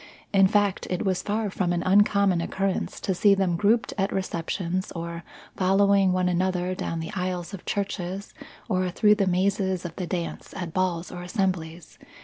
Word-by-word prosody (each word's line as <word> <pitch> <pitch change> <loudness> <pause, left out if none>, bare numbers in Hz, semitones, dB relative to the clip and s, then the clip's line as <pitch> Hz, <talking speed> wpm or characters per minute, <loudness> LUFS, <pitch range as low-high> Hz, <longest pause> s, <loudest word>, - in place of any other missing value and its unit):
In 195 -1 +6
fact, 205 -1 +1
it 180 +3 -2
was 185 -2 +1
far 210 0 -1
from 180 -2 0
an 175 -1 0
uncommon 200 -2 +4
occurrence 195 +2 -2
to 190 - 0
see 200 +3 +4
them 190 -3 +1
grouped 215 +6 +2
at 195 +1 +1
receptions 185 0 -2
or 170 0 -5 0.3
following 195 0 +4
one 185 0 +1
another 180 0 0
down 165 -2 -3
the 160 - -5
aisles 180 0 -3
of 195 - -9
churches 195 -1 -3 0.3
or 185 -3 0
through 210 +4 +4
the 205 -2 +1
mazes 190 0 +1
of 170 -1 -6
the 180 - -3
dance 170 -1 -4
at 175 -3 -5
balls 180 -2 -1
or 180 - -7
assemblies. 180 -3 -3
185 Hz, 170 wpm, -26 LUFS, 175-195 Hz, 0.3 s, In